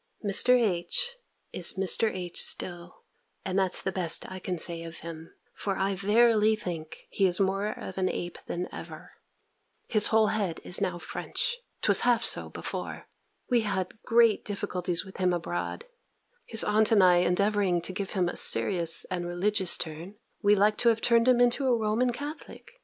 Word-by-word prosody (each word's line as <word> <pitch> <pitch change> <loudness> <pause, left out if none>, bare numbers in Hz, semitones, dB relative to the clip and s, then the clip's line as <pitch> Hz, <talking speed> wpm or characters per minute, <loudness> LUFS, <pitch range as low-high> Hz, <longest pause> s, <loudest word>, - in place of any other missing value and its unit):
Mr. 250 +5 +4
H. 230 - +1 0.4
is 175 - +1
Mr. 195 +3 +2
H. 180 -2 +1
still; 175 0 -1 0.4
and 190 0 -1
that's 190 -2 +1
the 190 - -1
best 175 -3 +1
I 185 - -7
can 180 0 -4
say 165 0 -1
of 165 0 -8
him; 165 0 -9 0.2
for 195 -2 -3
I 195 +1 0
verily 215 +2 +3
think, 170 -6 -7
he 195 - +2
is 180 +1 +2
more 195 +1 0
of 190 -2 -6
an 185 0 +1
ape 175 0 -5
than 175 +1 -4
ever. - - -10 0.8
His 215 -2 +3
whole 220 -2 +3
head 200 -6 -2
is 180 - -1
now 175 -1 -1
French. 480 - -3 0.2
'Twas - - +4
half 240 -1 +2
so - - +1
before. - - -6 0.4
We 240 -2 +2
had 200 -1 -4
great 230 -2 +3
difficulties 180 -4 -2
with 190 - -12
him 185 -1 +1
abroad: 175 - -4 0.6
his 225 - +2
aunt 215 +1 +2
and 205 -4 +5
I 180 -1 +5
endeavouring 190 +1 +1
to 185 - -6
give 195 0 -5
him 185 -3 0
a - - -4
serious 170 -4 +2
and 175 -1 -3
religious 190 +2 0
turn, 165 +5 -7 0.3
we 205 -1 +4
had 205 - +2
like 210 +1 +3
to 235 - +3
have 225 0 0
turned 235 0 +3
him 250 -1 +4
into 245 +3 +2
a 245 -2 +3
Roman 225 +3 0
Catholic. 290 +5 -9
195 Hz, 180 wpm, -27 LUFS, 180-220 Hz, 0.8 s, and